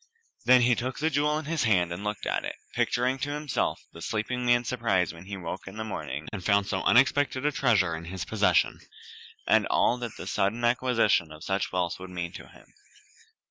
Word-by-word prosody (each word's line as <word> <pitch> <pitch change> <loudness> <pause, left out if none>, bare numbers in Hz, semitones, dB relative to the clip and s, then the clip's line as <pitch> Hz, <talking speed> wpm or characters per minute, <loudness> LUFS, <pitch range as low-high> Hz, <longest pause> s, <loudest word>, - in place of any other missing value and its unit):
Then 125 +1 +7
he 120 +1 +4
took 125 +2 -3
the 160 +2 0
jewel 150 +2 +1
in 155 - -5
his 160 -1 -1
hand 90 -6 +2
and 90 +4 -6
looked 105 -1 -3
at - - -1
it, - - -4 0.2
picturing 125 +2 0
to 145 +2 -2
himself 150 -3 -2
the 85 - -11
sleeping 125 +6 -2
man's 120 -1 +3
surprise 100 - 0
when 85 +2 -12
he 100 - -5
awoke 90 -1 -6
in 95 +3 -8
the 110 - -3
morning 80 -8 -5
and 95 -4 -5
found 100 +1 +3
so - - -2
unexpected 135 +1 +3
a 150 - +3
treasure 110 - +2
in 80 +1 -8
his 90 +1 -5
possession, 105 -1 +2 0.7
and - - +3
all 125 - +2
that 120 -3 -6
the - - -7
sudden 110 +5 -1
acquisition 120 -8 +2
of 75 0 -11
such 95 0 -1
wealth 90 -1 -1
would 95 0 -8
mean 90 -2 -5
to - - -10
him. - - -19
110 Hz, 210 wpm, -27 LUFS, 95-125 Hz, 0.7 s, Then